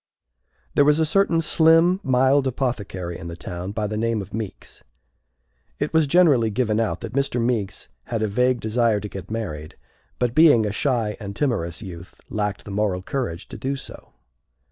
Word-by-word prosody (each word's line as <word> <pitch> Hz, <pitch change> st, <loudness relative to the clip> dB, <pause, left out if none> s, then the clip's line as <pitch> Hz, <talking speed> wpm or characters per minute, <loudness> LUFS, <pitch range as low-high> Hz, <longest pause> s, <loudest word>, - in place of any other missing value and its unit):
There 145 Hz, -, +5 dB
was 150 Hz, +2 st, +4 dB
a 160 Hz, -, +3 dB
certain 165 Hz, 0 st, +2 dB
slim, 165 Hz, +3 st, +4 dB
mild 135 Hz, -1 st, +3 dB
apothecary 105 Hz, -9 st, -3 dB
in 85 Hz, -, -7 dB
the 85 Hz, -, -6 dB
town, 90 Hz, +2 st, -6 dB
by 105 Hz, +1 st, -2 dB
the 105 Hz, +1 st, -3 dB
name 115 Hz, 0 st, 0 dB
of 100 Hz, -1 st, -8 dB
Meeks. 110 Hz, -2 st, -7 dB, 1.0 s
It 145 Hz, +2 st, -3 dB
was 160 Hz, -2 st, +4 dB
generally 140 Hz, -8 st, +4 dB
given 110 Hz, 0 st, 0 dB
out 115 Hz, -, -1 dB
that 115 Hz, 0 st, -6 dB
Mr. 135 Hz, -2 st, 0 dB
Meeks 115 Hz, -4 st, -1 dB, 0.2 s
had 115 Hz, -2 st, -2 dB
a -, -, +1 dB
vague 125 Hz, +4 st, +1 dB
desire 110 Hz, -1 st, +1 dB
to 105 Hz, -, -6 dB
get 95 Hz, -2 st, -9 dB
married, 90 Hz, -9 st, -5 dB, 0.4 s
but, 125 Hz, -2 st, 0 dB
being 145 Hz, -7 st, +6 dB
a 105 Hz, -, -1 dB
shy 115 Hz, -2 st, 0 dB
and 100 Hz, -2 st, -7 dB
timorous 105 Hz, -, -1 dB
youth, 90 Hz, -2 st, -10 dB
lacked 105 Hz, -3 st, -2 dB
the 105 Hz, -, -8 dB
moral 100 Hz, -2 st, -1 dB
courage 110 Hz, -, -4 dB
to -, -, -8 dB
do 135 Hz, +1 st, -2 dB
so. 135 Hz, -, -11 dB
115 Hz, 180 wpm, -23 LUFS, 100-135 Hz, 1.0 s, being